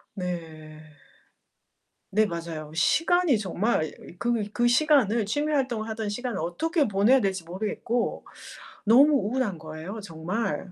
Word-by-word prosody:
네. 155 -4 -7 1.2
네, 215 - +6
맞아요. 165 -5 -5
시간이 330 - +3
정말 200 -2 0
이 155 - -6 0.2
으 - - -24
그 235 -1 0
그 240 +1 +1
시간을 240 -5 +3
취미 295 +8 -1
활동을 250 -6 0
하던 220 -1 -3
시간을 235 0 -3
어떻게 295 - 0
보내야 210 +7 +4
될지 190 -4 -1
모르겠고, 215 +6 -2 0.6
너무 270 +8 +6
우울한 230 -5 -1
거예요 160 +6 -7
정말. 185 +3 -3
210 Hz, 275 characters per minute, -26 LUFS, 170-245 Hz, 1.2 s, 네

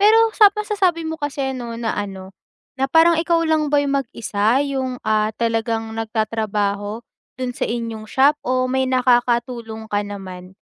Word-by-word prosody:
Pero 425 +2 +6 0.2
sa 420 -2 +7
masasabi 390 -6 0
mo 320 0 -5
kasi 275 -2 -2
ano, 240 -2 -6
na 230 -1 -2
ano 195 -2 -6 0.5
na 270 - +2
parang 325 +2 +5
ikaw 335 0 +1
lang 315 -2 +1
ba 290 - +2
yung 280 - -1
mag-isa 225 -2 -1
yung, 260 -2 -2
ah, 215 0 +2
talagang 225 -1 -1
nagtatrabaho 215 -1 -2 0.3
dun 255 -1 -3
sa - - -3
inyong 225 -2 -4
shop 285 +3 +3
o 255 0 0
may 265 0 +1
nakakatulong 240 -3 +1
ka 205 -2 -1
naman? 190 -2 -8
240 Hz, 155 wpm, -20 LUFS, 215-280 Hz, 0.5 s, sa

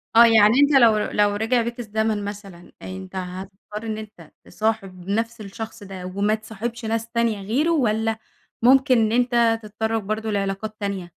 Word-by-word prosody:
آه، 235 - +9
يعني 220 -1 +6
أنت 285 +1 +4
لو 225 -2 +6
لو 205 -1 +1
رجع 225 +3 +1
بيك 235 +1 -5
الزمن 220 -2 -1
مثلًا، 195 -4 -9
أنت 190 0 -8
هتضطر 190 +3 -7
إن 220 -1 -3
أنت 210 -7 -11
تصاحب 195 -5 -3
نفس 230 +2 -2
الشخص 220 +2 -8
ده 190 -2 -8
وما 200 +3 0
تصاحبش 225 +2 -6
ناس 225 +1 -2
تانية 230 -3 0
غيره، 280 +10 +1
والّا 225 -6 +1 0.4
ممكن 260 +1 +5
إن 220 -1 +2
أنت 235 -1 +2
تتطرَّق 220 +1 -2
برضه 215 +2 -3
لعلاقات 200 +2 -2
تانية؟ 200 -3 -3
220 Hz, 160 wpm, -23 LUFS, 200-230 Hz, 0.4 s, آه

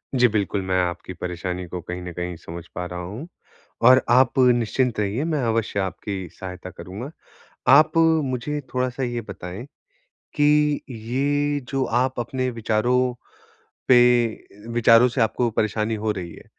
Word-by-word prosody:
जी, 125 -1 +5
बिल्कुल, 100 -2 -1
मैं 95 0 -1
आपकी 90 +1 -4
परेशानी 90 +1 -4
को 90 +1 -5
कहीं 90 +2 -6
न 90 0 -6
कहीं 90 0 -4
समझ 85 0 -9
पा 90 - -3
रहा 90 0 -6
हूँ 105 - -7 0.6
और 130 0 +8
आप 130 +2 +4
निश्चिंत 120 -1 +2
रहिए, 105 +7 -1
मैं 155 -4 -1
अवश्य 115 -3 0
आपकी 95 0 -4
सहायता 90 -1 -8
करूँगा। 110 - -8 0.6
आप 155 +3 +5 0.3
मुझे 130 +3 -3
थोड़ा-सा 125 +1 -1
ये 120 -1 -2
बताएँ, 95 +3 -7 0.7
कि 150 0 +3
ये 140 +5 -1
जो 135 -1 0
आप 125 +1 0
अपने 130 +2 -2
विचारों 120 +2 +1 0.7
पे 125 -1 +7 0.7
विचारों 115 +1 +6
से 125 +1 -3
आपको 115 +1 +1
परेशानी 110 +1 -1
हो 110 0 -1
रही 90 -4 -6
है, - - -14
115 Hz, 150 wpm, -23 LUFS, 95-130 Hz, 0.7 s, और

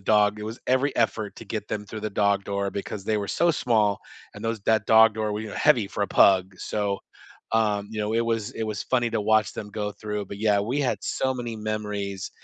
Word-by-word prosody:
dog 105 0 +3
it - - -5
was 110 +3 -6
every 130 +2 +2
effort 110 -2 0
to - - -9
get 110 -2 -4
them 105 -1 -3
through 110 +1 -7
the 110 - -1
dog 100 -1 +1
door 100 0 -2
because 100 0 -5
they 110 +1 +1
were 100 - -3
so 170 - +3
small, 110 -9 +2 0.4
and - - -9
those 115 -1 -1
that 110 0 +2
dog 110 -1 +7
door 110 -1 -1
w 110 +1 -4
y - - -7
heavy 110 -5 +3
for 105 - -3
a - - -8
pug, 95 -1 +4
so, 100 -2 -2 0.5
um, 105 -2 +1
you 110 - -6
know, 105 +1 -1
it 115 +1 +2
was 115 -2 -1
it - - -4
was 105 -2 -3
funny 120 -2 +1
to - - 0
watch 110 +1 +2
them 105 - -6
go 105 0 -3
through, 105 0 -4
but, 100 - -8
yeah, 105 -1 +3
we 120 +8 -1
had 135 - 0
so 130 0 -1
many 120 -3 -5
memories 105 -3 -4
105 Hz, 235 wpm, -25 LUFS, 100-110 Hz, 0.5 s, dog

